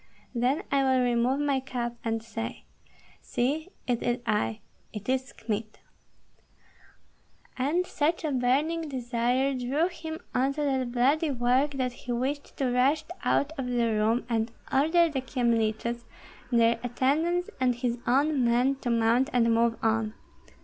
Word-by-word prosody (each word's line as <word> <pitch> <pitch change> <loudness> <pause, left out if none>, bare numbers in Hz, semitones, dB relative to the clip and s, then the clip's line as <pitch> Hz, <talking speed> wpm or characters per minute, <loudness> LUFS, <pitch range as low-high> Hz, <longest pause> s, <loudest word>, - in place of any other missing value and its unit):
Then 250 +4 +1
I 275 0 +3
will 260 -1 +3
remove 245 +2 +2
my 285 -2 +1
cap 250 -3 -3
and 225 -1 -2
say, 225 0 -6 0.6
'See, 300 +8 -1 0.2
it 245 -2 0
is 240 0 0
I, 110 - 0 0.3
it 210 -2 -8
is 260 0 0
Kmita!'" 220 -1 -4 1.8
And 300 +8 +1
such 325 0 0
a 310 - -1
burning 290 +6 +1
desire 250 +1 0
drew 270 +7 0
him 320 -3 -6 0.2
on 265 +2 +2
to 300 - -1
that 260 -3 0
bloody 275 +6 +2
work 260 +3 +2
that 255 -2 -1
he 245 - -7
wished 265 +4 -3
to 260 -3 0
rush 270 +5 +3 0.2
out 285 - +2
of 260 - -2
the 240 -2 +1
room 220 +3 +1
and 225 -1 0 0.2
order 325 +5 +4
the 285 -5 -2
Kyemliches, 235 -2 0 0.5
their 230 -1 +4
attendants, 310 +9 0
and 250 -1 +2
his 240 -1 -2
own 280 +2 +3
men 245 +3 +2
to 250 - -4
mount 235 +3 +3
and 230 -2 +3
move 230 0 +3
on. 225 -1 +1
250 Hz, 150 wpm, -28 LUFS, 235-280 Hz, 1.8 s, order